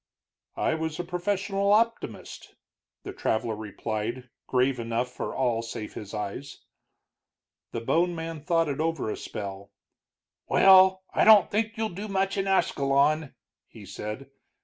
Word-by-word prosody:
"I - - +1
was 160 0 -3
a - - -1
professional 195 +3 -1
optimist," 230 +2 -1 0.5
the - - -7
traveler 110 0 -1
replied, 110 +3 -5 0.2
grave 125 0 +1
enough 115 +2 -2
for - - -5
all 120 -3 +1
save 115 -2 -7
his 105 -1 -8
eyes. 110 +6 -6 1.1
The 115 - -4
bone 175 +8 +1
man 165 -1 -5
thought 165 +1 +1
it 140 -1 -3
over 160 -8 -1
a - - -3
spell. 100 0 -7 0.8
"Well, 190 0 +6
I - - +3
don't 215 -3 +7
think 220 +2 -1
you'll 220 0 -1
do 200 +4 -6
much 195 -1 0
in 195 -1 -1
Ascalon," 145 -4 +1 0.3
he - - -13
said. 110 +6 -7
155 Hz, 140 wpm, -27 LUFS, 115-190 Hz, 1.1 s, don't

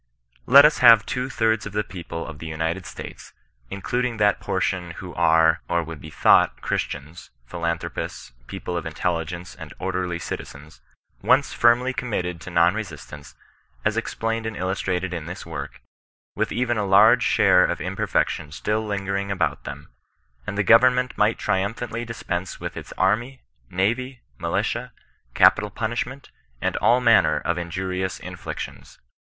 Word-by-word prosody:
Let 140 +3 +9
US 150 - +3
hare 115 -2 +9
two 125 +4 -4
thirds 110 -3 0
of 100 - -9
the 105 +1 0
people 85 -3 -7
of 80 -3 -9
the 80 - -7
United 80 +4 -3
States - - -10 0.4
(including 120 +4 -2
that 105 -2 +3
portion 90 -3 -2
who - - -8
are^ 80 0 +4
or 85 -1 +1
would 80 -2 -9
be 80 - -9
thought - - +4
Christians, 80 +5 -4 0.2
philanthropists, 85 -4 -4 0.2
people 90 - -5
of 85 - -3
intelli 80 0 -2
gence 85 0 -8
and - - -9
orderly 90 -2 -2
citizens) 75 -2 -8 0.4
once 135 +1 +3
finnly 125 +2 +3
committed 90 -8 -3
to - - -8
non 85 0 +4
resistance, 75 -8 -8 0.5
as - - +2
explained 115 0 -2
and 110 - -5
illustrated 95 -1 -2
in 85 -3 -5
this 90 - -7
work, - - -7 0.5
with - - -1
even 120 -2 0
a - - 0
large 100 +3 +6
share - - +4
of - - -1
imperfection 75 - -1
still 105 +8 -1
lingering 100 -1 -2
about 80 -7 -1
them, 70 +3 -8 0.6
and 100 - -4
the 105 - +2
government 125 +4 +4
might 105 +2 +2
iaiumphantly 115 +4 -2
dispense 95 -5 -4
with - - -6
its - - -8
army, 115 +7 0 0.3
navy, 120 +7 -1 0.2
miUtia, - - -1 0.5
ca^utal 105 0 +5
punish 115 +1 -1
ment, 130 +2 -11 0.3
and - - -1
all 120 +2 +4
manner 115 -2 +4
of 85 +1 -1
injurious 95 +2 -3
iiuflictions. 65 -2 -8
95 Hz, 150 wpm, -23 LUFS, 85-115 Hz, 0.6 s, Let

